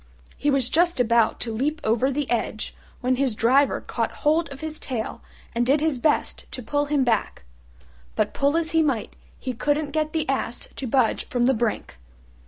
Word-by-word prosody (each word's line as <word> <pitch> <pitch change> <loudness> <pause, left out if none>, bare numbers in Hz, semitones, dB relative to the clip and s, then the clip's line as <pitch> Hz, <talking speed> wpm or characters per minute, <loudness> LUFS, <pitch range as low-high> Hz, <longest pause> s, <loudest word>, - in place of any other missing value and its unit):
He 295 - 0
was 275 -3 +3
just 340 +2 +2
about 235 -2 +3
to 230 - -3
leap 295 +7 -1
over 230 +4 +2
the 285 0 -2
edge 220 -2 -2 0.3
when 255 0 +1
his 260 -4 +1
Driver 260 +6 +3
caught - - -2 0.2
hold 315 +2 +3
of 275 - -8
his 315 -1 -5
tail 240 -5 -4 0.3
and 235 0 +1
did 275 +5 +3
his 305 -4 0
best 295 +4 0
to 250 - -5
pull 290 +5 0
him 290 -2 +1
back: 225 - 0 0.7
but - - 0
pull 280 +3 +2
as 330 -1 -1
he 325 -1 +4
might 275 -8 -1 0.2
he 255 - -4
couldn't 290 +4 0
get 310 0 0
the 315 -2 -1
Ass 260 -3 -2
to 265 - -3
budge 245 -1 +1
from 245 -1 +1
the 265 - +4
brink. 225 - -2
270 Hz, 190 wpm, -24 LUFS, 240-300 Hz, 0.7 s, he